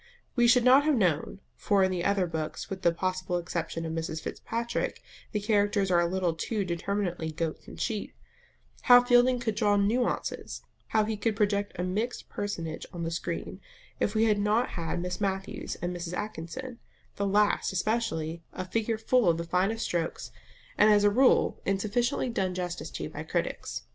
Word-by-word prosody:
We 240 -2 +4
should 240 +1 +5
not 260 +3 +7
have 305 -2 +3
known 180 -1 0
(for 200 -2 +2
in 190 - +2
the 180 -2 -2
other 200 -1 +2
books, 160 0 -4
with 190 -1 -4
the 175 -2 +4
possible 185 +1 -2
exception 170 -1 -3
of 160 - -3
Mrs. 160 -1 -3
Fitzpatrick, 235 - -3 0.3
the 210 - 0
characters 205 -2 +1
are 175 - +5
a 170 - +2
little 180 -1 0
too 200 +5 -2
determinately 175 -1 -2
goats 160 0 -4
and - - -10
sheep) 215 -4 -2 0.8
how 245 0 +10
Fielding 245 +1 +5
could 230 -2 -1
draw 205 -1 +2
nuances, 215 +5 -1 0.2
how 215 -1 +2
he 220 0 -2
could 220 +1 0
project 205 0 0
a 180 - -1
mixed 210 +7 -3
personage 165 -6 -4
on 170 -1 -5
the 165 - -2
screen, 170 +3 -4 0.4
if 210 - 0
we 220 - +4
had 210 -2 +3
not 215 +4 +2
had 165 0 -3
Miss 180 +1 -4
Matthews 195 -1 -2
and 175 0 -2
Mrs. 175 0 -5
Atkinson 215 +6 -5 0.4
the 200 - 0
last 205 +1 +2
especially 180 -5 -1
a 185 - -4
figure 225 +3 -1
full 220 -2 +3
of 165 - +2
the 170 - -3
finest 190 +7 0
strokes, 170 -2 -2 0.5
and, 210 - +7
as 205 -1 +5
a 205 - +5
rule, 255 +5 +3
insufficiently 215 +8 0
done 190 -6 -1
justice 180 -1 -4
to - - -5
by - - -7
critics. - - -3
200 Hz, 180 wpm, -28 LUFS, 175-220 Hz, 0.8 s, how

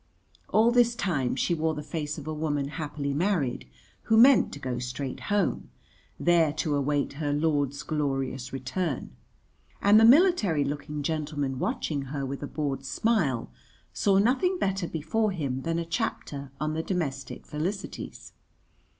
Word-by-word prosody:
All 225 +2 +4
this 240 -1 +4
time 155 - 0
she 170 - +1
wore 160 -1 0
the 150 - -5
face 150 0 -4
of 150 - -7
a 155 - -3
woman 145 -2 -1
happily 145 -3 -3
married 145 - 0 0.4
who 220 - +3
meant 255 +3 +7
to - - -6
go 130 -3 -3
straight 125 +2 -4
home, 205 -3 0 0.5
there 170 -3 +4
to 150 -1 -1
await 145 0 0
her 145 -1 0
lord's 145 -2 0
glorious 135 -4 -2
return; 135 +4 -3 0.7
and 205 +2 +6
the - - +5
military 235 - +5
looking 145 +1 -4
gentleman 145 -3 -2
watching 140 -3 -2
her 140 -1 -3
with 135 +1 -5
a 145 - -4
bored 140 -3 -3
smile 140 - 0 0.4
saw 195 - +3
nothing 270 - +2
better 195 - -1
before 205 +7 -1
him 135 -6 -2
than 165 +3 -1
a 170 - -2
chapter 140 -4 -3
on 155 +1 -1
the 160 - -1
Domestic 140 -8 -3
Felicities. 180 +7 -5
150 Hz, 150 wpm, -27 LUFS, 140-185 Hz, 0.7 s, meant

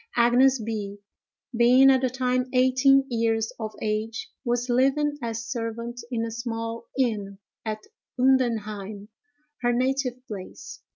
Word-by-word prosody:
Agnes 245 +3 +5
B——, 210 -2 -4 0.6
being 250 +3 +6
at 260 -1 +3
the 260 - +1
time 255 0 0
eighteen 260 +2 +4
years 225 -2 0
of 215 -1 -5
age, 215 +1 -3
was 240 -1 -1
living 275 +4 +2
as 230 0 -4
servant 235 0 -4
in 230 -3 -1
a 230 - -5
small 230 0 -5
inn 210 -6 -1 0.3
at 215 -1 -4 0.4
Undenheim, 215 -6 0 0.5
her 240 -1 +2
native 255 0 -1
place. 205 +8 -9
240 Hz, 125 wpm, -25 LUFS, 225-255 Hz, 0.6 s, being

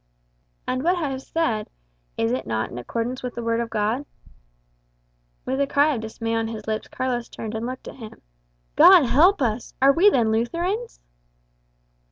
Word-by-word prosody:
"And 255 0 -1
what 350 +5 +2
I 315 -6 -2
have 265 0 -5
said 240 -10 -2 0.5
is 115 0 0
it 130 0 -3
not 110 -1 -2
in 120 - -6
accordance 235 - -4
with 250 -1 -6
the 235 - -5
Word 230 0 0
of 235 -1 -2
God?" 225 +5 -1 1.4
With 265 +2 -1
a 280 - +1
cry 290 +2 +3
of 235 - -3
dismay 225 +1 -4
on 225 0 0
his 220 -2 -7
lips, 215 0 -3
Carlos 245 -2 -3
turned 220 -1 -7
and 220 +2 -3
looked 255 +1 -7
at - - -9
him 225 -4 -11 0.6
"God 360 -6 +8
help 335 +7 +4
us! 230 0 -2
Are 270 +1 +6
we 365 +8 +6
then 235 - +2
Lutherans?" 345 - -2
240 Hz, 180 wpm, -23 LUFS, 220-280 Hz, 1.4 s, God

